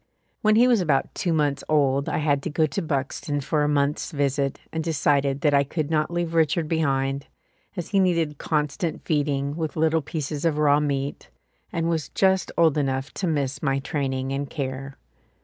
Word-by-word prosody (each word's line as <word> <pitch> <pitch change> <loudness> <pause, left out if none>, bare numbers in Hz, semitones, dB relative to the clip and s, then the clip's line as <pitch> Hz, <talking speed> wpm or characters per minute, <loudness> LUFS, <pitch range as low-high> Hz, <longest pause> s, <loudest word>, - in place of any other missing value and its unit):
When 215 0 +4
he 240 +3 +6
was 240 -5 +4
about 150 -6 +1
two 175 - -1
months 145 -3 +1
old 140 -2 +2
I - - -1
had 145 -2 +1
to 165 - -3
go 155 +1 +2
to 155 +6 -3
Buxton 145 -1 -2
for 150 +3 0
a 145 - +2
month's 145 0 0
visit 140 -1 0
and 160 0 -2
decided 140 -3 +1
that 150 -2 +3
I 140 0 +5
could 155 +2 -3
not 155 -1 +1
leave 170 -1 -2
Richard 165 0 +2
behind, 140 -3 0 0.5
as 175 - -4
he 200 - +2
needed 165 -6 +1
constant 150 +2 -2
feeding 145 -2 0
with 160 -2 -3
little 160 0 +2
pieces 150 0 -4
of 160 -3 +1
raw 145 -1 +4
meat 140 -1 -2 0.4
and 165 0 -1
was 160 -4 -1
just 190 -1 +2
old 160 -3 +4
enough 135 0 -2
to 185 - -2
miss 140 -4 -1
my 135 -2 +1
training 135 -1 -2
and 140 0 -3
care. 135 -1 -5
150 Hz, 185 wpm, -24 LUFS, 140-160 Hz, 0.5 s, he